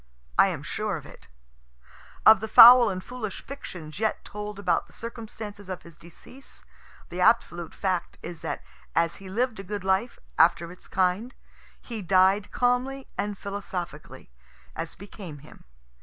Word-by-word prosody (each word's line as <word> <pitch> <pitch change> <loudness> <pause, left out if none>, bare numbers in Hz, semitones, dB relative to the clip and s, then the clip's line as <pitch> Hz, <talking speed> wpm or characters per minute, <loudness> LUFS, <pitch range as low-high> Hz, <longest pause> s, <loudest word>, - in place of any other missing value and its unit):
I - - +8
am - - -4
sure - - -2
of - - -11
it. - - -15 1.0
Of 220 -2 +9
the 220 - -4
foul 240 +3 +10
and 185 -1 -4
foolish 235 -6 -6
fictions 180 - -8
yet 220 0 -1
told 210 0 -7
about 200 - 0
the - - -21
circumstances 220 -3 -8
of 185 -1 -5
his 170 -2 -14
decease, 175 - -14 0.5
the 180 +1 -4
absolute 175 -6 +2
fact 185 -3 -2
is 170 -2 -8
that - - -4 0.3
as 165 0 +1
he 195 -1 -11
lived 225 +2 -1
a - - -6
good 205 0 -5
life, 190 +5 0 0.2
after 170 0 +4
its 180 - -13
kind, 190 +7 0 0.4
he 230 -3 -7
died 190 +2 +3
calmly 250 +2 0
and 205 -1 -3
philosophically, 180 - -7 0.4
as 165 0 -5
became 190 -5 -10
him. - - -16
200 Hz, 155 wpm, -26 LUFS, 180-225 Hz, 1.0 s, foul